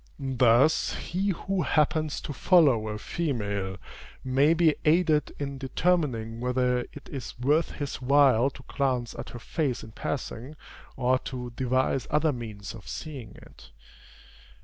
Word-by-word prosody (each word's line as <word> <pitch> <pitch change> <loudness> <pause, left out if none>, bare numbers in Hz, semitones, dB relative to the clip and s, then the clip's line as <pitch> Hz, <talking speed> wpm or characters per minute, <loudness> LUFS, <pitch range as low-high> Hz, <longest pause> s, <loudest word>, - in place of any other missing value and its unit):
Thus 125 +5 +4
he 190 +4 -2
who 190 +1 -1
happens 155 0 +1
to 145 - -5
follow 135 - +4
a 105 0 -3
female 100 - -3 0.5
may 135 +5 +3
be 160 -2 +4
aided 155 -2 +3
in 140 -1 -4
determining 130 -6 0
whether 125 0 +1
it - - -12
is 135 -4 -6
worth 145 +7 +1
his 145 -3 -5
while 135 -2 +4
to 130 -1 -14
glance 130 -4 -1
at - - -7
her - - -8
face 135 +1 -2
in 110 - -10
passing, 130 +3 -5 0.4
or 130 0 +2
to 125 -2 -6
devise 130 +1 0
other 150 0 +2
means 110 -5 -7
of 115 - -12
seeing 135 -10 -7
it. - - -16
130 Hz, 140 wpm, -27 LUFS, 120-150 Hz, 0.5 s, Thus